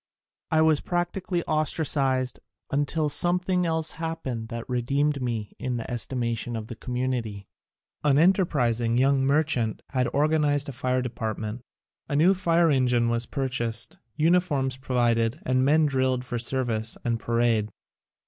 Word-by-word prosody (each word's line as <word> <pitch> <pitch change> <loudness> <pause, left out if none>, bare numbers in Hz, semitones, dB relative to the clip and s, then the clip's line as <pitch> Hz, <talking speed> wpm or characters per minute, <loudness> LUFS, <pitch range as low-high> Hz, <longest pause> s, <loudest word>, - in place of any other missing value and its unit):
I 160 0 +3
was 155 -2 +3
practically 175 0 -2
ostracised 140 -5 0 0.3
until 145 +2 0
something 180 +4 +2
else 160 -1 0
happened 160 -9 -4
which 115 0 -5
re 125 -1 -1
deemed 140 +3 0
me 115 -4 -3
in 125 -1 -2
the 115 +2 -6
estimation 120 -1 -2
of 110 -1 -4
the 115 - -8
com 125 +2 -6
munity. 120 -6 -2 0.6
An 145 -2 +4
enterprising 125 - +2
young 135 +1 +3
merchant 140 -5 +1
had 130 -2 0
or 145 +2 +2
ganized 145 -2 +1
a - - -6
fire 125 +1 0
department. 110 -1 -4 0.5
A 145 - -1
new 170 +6 +5
fire 170 -3 +2
en 130 -2 +3
gine 120 -1 +2
was 115 0 -1
purchased, 120 -4 -3 0.2
uniforms 155 -5 +2
provided 120 -1 0
and 130 0 +2
the - - +3
men 155 +2 +4
drilled 130 -2 0
for 120 -1 -3
service 115 -3 -2
and 115 -1 0
parade. 115 -2 +1
130 Hz, 150 wpm, -26 LUFS, 120-155 Hz, 0.6 s, new